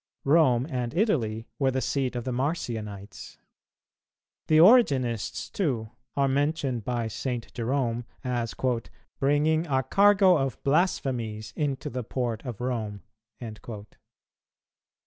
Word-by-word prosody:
Rome 135 -5 +4
and 125 -2 -3
Italy 115 - +1
were 135 - +3
the 130 0 0
seat 130 -1 -1
of 120 - -3
the 130 - -3
Marcionites. 115 - -4 1.1
The 155 - +4
Origenists, 145 - +4
too, 120 - -1 0.3
are 140 -1 +3
mentioned 135 -3 0
by 120 0 -2
St. 120 +1 -4
Jerome 120 -1 -1 0.2
as 120 -3 -2 0.6
"bringing 150 +4 +2
a 135 -2 +1
cargo 195 +3 +5
of 135 -4 -1
blasphemies 125 - 0
into 140 -3 -2
the 125 +1 -3
port 120 -1 -3
of 120 -5 -6
Rome." 110 -6 -3
130 Hz, 110 wpm, -27 LUFS, 115-145 Hz, 1.1 s, cargo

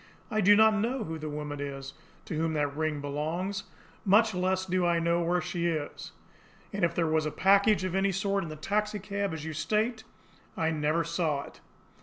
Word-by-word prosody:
I 215 - +1
do 205 +2 +7
not 220 +1 +6
know 230 +4 0
who 160 -4 -5
the 155 0 -5
woman 150 -1 -5
is 135 -1 -5 0.3
to - - -5
whom 160 +1 0
that 145 -2 -1
ring 155 -1 -1
belongs, 160 +7 -3 0.4
much 215 +3 +4
less 185 +1 0
do 185 0 0
I 170 -1 +3
know 170 +1 +1
where 175 +1 +1
she 170 +1 -2
is. 155 -3 -3 0.6
And 200 -1 -2
if 170 - +2
there 170 - +2
was 155 -1 +1
a - - -3
package 200 +3 +4
of 185 -2 -2
any 195 +1 +2
sort 195 +1 0
in 165 - -6
the 155 - -6
taxicab, 200 +2 -2
as 160 -1 -5
you 160 - -4
state, 220 - 0 0.5
I 160 0 +1
never 155 +1 +1
saw 160 -3 -1
it." - - -14
170 Hz, 200 wpm, -29 LUFS, 155-200 Hz, 0.6 s, do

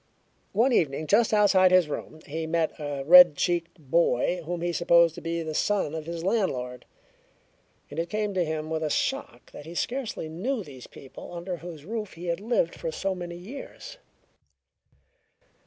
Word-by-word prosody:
One 240 +6 +3
evening 155 -5 +1
just 215 +7 +3
outside 200 -3 +5
his 185 -3 +5
room 155 +1 -6
he 160 +2 -4
met 165 -1 +1
a 145 -2 -4
red 175 -1 +9
cheeked 170 +3 -1
boy 165 +2 +1
whom 175 +1 -4
he 175 0 -1
supposed 170 -1 +4
to - - -9
be 165 0 -3
the 160 -1 -5
son 195 -2 0
of 160 -1 -5
his 170 -1 -5
landlord, 130 - -1 1.1
and - - -5
it 170 +1 -2
came 210 +1 -2
to 185 -2 +1
him 155 -1 -4
with 160 0 -1
a 155 - -1
shock 145 - -2
that 145 - -11
he 170 - -9
scarcely 245 -6 -3
knew 210 +10 -3
these 135 -6 -12
people 135 - -12
under 175 +1 -5
whose 165 -3 -10
roof 215 0 -5
he 170 +2 -9
had 170 0 -1
lived 210 -6 0
for 165 - -5 0.2
many 175 -1 -7
years. 280 - -10
170 Hz, 170 wpm, -26 LUFS, 155-190 Hz, 1.1 s, red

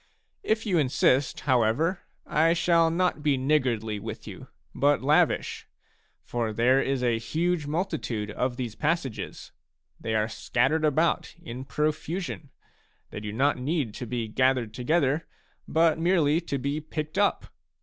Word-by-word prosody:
If 220 +1 0
you 185 -6 +2
insist, 135 -1 +2
however, 130 - +2 0.3
I 165 +2 +3
shall 170 -1 +3
not 175 -1 0
be 145 -2 +2
niggardly 125 -6 0
with - - -7
you, - - -9 0.3
but 140 +1 +2
lavish; 150 +3 +2 0.6
for 115 -2 -2
there 125 +5 +3
is 135 -2 -1
a 120 -2 +2
huge 160 +5 -1
multitude 150 - -2
of 125 +3 -2
these 120 -4 -4
passages; 150 -4 -3 0.5
they 110 - -2
are 110 0 +2
scattered 135 +7 0
about 155 +3 +1
in 130 -6 -7
pro 150 +2 +1
fusion, 160 -1 -6 0.3
— - - -40
they - - -5
do 105 0 -5
not 135 +5 +1
need 135 -4 -1
to 125 - -6
be 115 0 -2
gathered 125 -1 +1
together, 145 +4 +1 0.4
but 160 0 +3
merely 165 -2 +3
to 145 -5 -3
be 140 +3 -2
picked 155 +3 -4
up. 205 - +1
145 Hz, 150 wpm, -27 LUFS, 125-160 Hz, 0.6 s, I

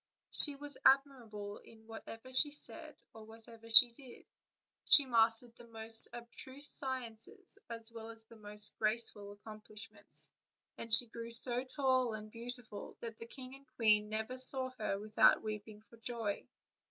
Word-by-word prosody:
She 290 -2 +2
was 285 0 -11
admirable 240 -7 -1
in 220 -1 -20
whatever 225 +2 -12
she 290 +3 +1
said 295 - 0 0.2
or 220 - -14
whatever 225 +1 -16
she 235 +2 +8
did; 250 0 -16 0.6
she 285 - +7
mastered 230 -1 +2
the 235 - -17
most 225 0 0
abstruse 260 +4 -4
sciences 260 - -1
as 230 0 +1
well 225 -1 -11
as 225 0 -12
the 225 +1 -19
most 210 -1 +2
graceful 215 -2 0
accomplishments, 215 +1 -4 0.4
and 230 - -10
she 225 +3 +4
grew 230 0 -10
so 240 +1 +2
tall 255 -4 -2
and 215 0 -11
beautiful 235 -2 -10
that 230 -1 -9
the 230 - -11
king 255 +1 -11
and 275 0 -17
queen 210 -2 +1
never 220 +4 -6
saw 260 0 +3
her 205 -2 -4
without 210 +1 +1
weeping 215 0 -9
for 230 - -21
joy. 225 -3 -6
230 Hz, 155 wpm, -32 LUFS, 220-255 Hz, 0.6 s, she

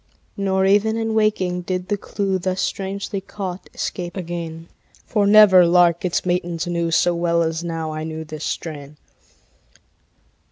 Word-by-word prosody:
Nor 190 -1 +1
even 210 +3 +3
in 225 -1 -1
waking 190 -5 +1
did 180 0 -3
the 205 - +2
clew, 195 -1 -2
Thus 185 +1 -2
strangely 195 +1 -3
caught, 190 -2 -7
escape 175 0 -4
again; 165 -2 -6 0.4
For 205 -3 +1
never 205 -3 +8
lark 175 0 +4
its 180 0 -1
matins 175 -1 -1
knew 170 -1 -1
So 175 +1 +3
well 170 0 +1
as 165 +1 -2
now 165 -2 -4
I 155 0 -4
knew 160 0 -5
this 155 0 -8
strain. 150 -2 -5
180 Hz, 150 wpm, -21 LUFS, 170-195 Hz, 0.4 s, never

